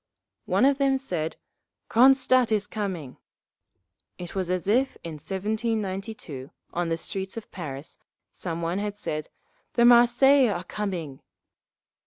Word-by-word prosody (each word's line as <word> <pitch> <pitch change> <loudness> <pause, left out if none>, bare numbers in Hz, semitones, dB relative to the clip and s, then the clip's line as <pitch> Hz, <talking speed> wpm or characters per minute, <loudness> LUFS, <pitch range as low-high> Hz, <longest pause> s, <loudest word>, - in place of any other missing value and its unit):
One - - +3
of 280 0 +3
them 270 -1 +3
said, 175 - -3 0.5
"Cronstadt 255 0 +5
is 210 -2 +2
coming!"… 190 -11 -5 1.0
It 175 -1 -8
was 185 -2 -2
as 185 0 -1
if, 255 +6 +2
in 165 - -6
1792, 200 - -3 0.2
on 175 -1 -1
the 165 - 0
streets 190 +4 -5
of 230 - -8
Paris, 145 -5 -7 0.3
some 170 -2 -4
one 170 +3 -1
had 205 0 -3
said: 155 -7 -4 0.4
"The 235 - +4
Marseillais 245 +2 +6
are 180 -3 -2
coming!" 175 -8 -4
200 Hz, 130 wpm, -26 LUFS, 170-235 Hz, 1.0 s, Marseillais